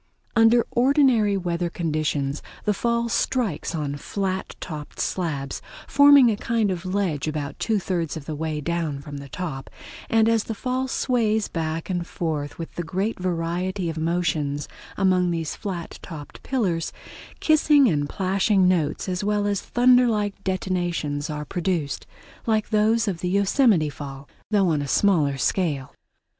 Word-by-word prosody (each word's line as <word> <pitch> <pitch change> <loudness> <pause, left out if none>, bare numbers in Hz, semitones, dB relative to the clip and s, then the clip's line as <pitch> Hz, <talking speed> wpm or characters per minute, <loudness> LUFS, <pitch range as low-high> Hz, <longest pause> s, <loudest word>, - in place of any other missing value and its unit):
Under 225 +1 +5
ordinary 245 -6 +3
weather 175 -1 -1
conditions 155 -4 -1 0.2
the 210 - +3
fall 235 +2 0
strikes 230 - -1
on 145 -2 -2
flat 190 +5 -3
topped 150 -4 -7
slabs, 145 -7 -2 0.2
forming 285 -3 +7
a - - 0
kind 220 -1 0
of 180 0 -4
ledge 185 -7 -1
about 150 -1 -4
two 220 -2 +1
thirds 175 -5 -2
of 150 - -8
the 155 - -4
way 155 0 -3
down 160 -2 -2
from 145 0 -8
the 140 0 -9
top, 150 -5 -5 0.4
and 225 -1 +4
as 225 -1 +2
the 225 - -4
fall 255 +3 -2
sways 220 -5 +1
back 160 -1 -3
and 175 -2 -2
forth 150 -3 -3
with 165 -2 -7
great 190 +7 -2
variety 180 +1 -1
of 160 - -8
motions 160 -4 -1 0.3
among 185 -2 +3
these 165 -2 -2
flat 180 -5 -6
topped 150 -4 -9
pillars, 185 -11 -1 0.5
kissing 300 -3 +5
and 145 -7 0
plashing 190 0 +2
notes 165 -4 +1
as 185 +1 -2
well 205 0 +1
as 200 -2 0
thunder 250 0 +4
like 205 -3 -1
detonations 175 -5 -1
are 150 -1 -4
produced, 170 -6 -2 0.4
like 220 -2 +1
those 220 +1 +3
of 185 -4 -2
the 180 - -2
Yosemite 200 - +3
Fall, 140 -1 -8 0.2
though 200 -4 +3
on 150 -3 +1
a 140 - -4
smaller 150 -5 +3
scale. 145 -3 -1
180 Hz, 150 wpm, -24 LUFS, 155-210 Hz, 0.5 s, forming